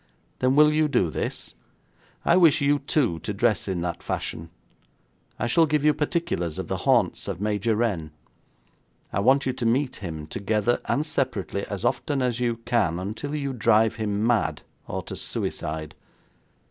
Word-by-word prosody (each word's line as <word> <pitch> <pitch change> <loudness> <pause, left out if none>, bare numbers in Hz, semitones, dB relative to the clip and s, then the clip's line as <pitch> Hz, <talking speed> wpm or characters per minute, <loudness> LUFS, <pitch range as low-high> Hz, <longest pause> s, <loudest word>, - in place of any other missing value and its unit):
'Then 130 +1 +2
will 150 +1 +6
you 155 0 +3
do 95 - +1
this? - - -4 0.7
I - - +5
wish 170 -5 +6
you 145 0 +2
two 130 - 0
to 100 +5 -4
dress 110 -2 +1
in 95 -3 -2
that 85 -1 -3
fashion. 80 +1 -4 0.9
I - - -1
shall 160 +8 +4
give 150 -1 +1
you 150 - +5
particulars 150 - -1
of - - -4
the - - -2
haunts - - +2
of - - -4
Major 105 +2 0
Renn. 100 -9 -1 1.0
I - - +1
want 130 +7 +4
you 130 - 0
to 125 - -5
meet 125 +4 +1
him 80 -6 -6
together 105 +7 0
and 150 - 0
separately, 110 -10 -2
as 100 +2 -4
often 135 +2 0
as 125 -2 0
you 120 -2 0
can, 105 -9 +1
until 110 +11 -4
you 140 -2 -2
drive 110 -1 +3
him 105 -1 -1
mad 80 -11 +1 0.2
or - - -4
to - - -6
suicide. 80 0 -4
115 Hz, 170 wpm, -25 LUFS, 100-140 Hz, 1.0 s, will